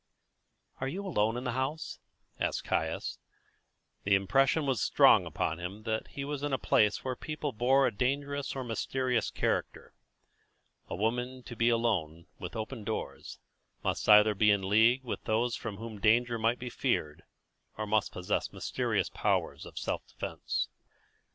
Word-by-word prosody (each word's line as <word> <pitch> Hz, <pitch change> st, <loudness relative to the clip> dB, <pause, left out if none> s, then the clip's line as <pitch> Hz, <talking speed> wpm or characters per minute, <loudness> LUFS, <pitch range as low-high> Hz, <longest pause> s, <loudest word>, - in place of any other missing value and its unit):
"Are 130 Hz, -, -2 dB
you 190 Hz, +8 st, -4 dB
alone 115 Hz, -, +1 dB
in 125 Hz, -, -4 dB
the 125 Hz, -, -1 dB
house?" 130 Hz, +6 st, -3 dB, 0.4 s
asked -, -, -1 dB
Caius. -, -, -2 dB, 0.8 s
The 100 Hz, 0 st, +4 dB
impression 135 Hz, +10 st, +3 dB
was 135 Hz, -5 st, 0 dB
strong -, -, +5 dB
upon 80 Hz, +2 st, -2 dB
him 95 Hz, +5 st, -6 dB
that 110 Hz, -1 st, -2 dB
he 140 Hz, -, -6 dB
was 145 Hz, -1 st, -4 dB
in 145 Hz, 0 st, -2 dB
a -, -, +3 dB
place 105 Hz, -3 st, +2 dB
where 130 Hz, -, -1 dB
the -, -, -13 dB
people 155 Hz, -2 st, -3 dB
bore 130 Hz, +4 st, +3 dB
a 125 Hz, -, +2 dB
dangerous 140 Hz, +5 st, -1 dB
or 135 Hz, -, -3 dB
mysterious 125 Hz, 0 st, -1 dB
character. -, -, -2 dB, 1.0 s
A -, -, -3 dB
woman 125 Hz, +5 st, -2 dB
to 120 Hz, -, -8 dB
be 115 Hz, +1 st, +3 dB
alone, 95 Hz, -9 st, 0 dB
with 90 Hz, -1 st, -6 dB
open 110 Hz, +1 st, -5 dB
doors, 110 Hz, +1 st, -5 dB, 0.5 s
must -, -, -1 dB
either 105 Hz, 0 st, +8 dB
be 105 Hz, +1 st, +3 dB
in 100 Hz, -2 st, +2 dB
league 115 Hz, +6 st, +4 dB
with 125 Hz, -, -5 dB
those 115 Hz, +2 st, +1 dB
from 110 Hz, -4 st, -6 dB
whom 110 Hz, -1 st, -7 dB
danger 115 Hz, +2 st, +3 dB
might 115 Hz, +2 st, +2 dB
be 125 Hz, 0 st, -6 dB
feared, 75 Hz, -1 st, -1 dB, 0.6 s
or 110 Hz, -, -2 dB
must 105 Hz, 0 st, +1 dB
possess 90 Hz, 0 st, -2 dB
mysterious -, -, -1 dB
powers -, -, -1 dB
of -, -, -13 dB
self -, -, -3 dB
defence. -, -, -3 dB
115 Hz, 165 wpm, -30 LUFS, 105-130 Hz, 1.0 s, either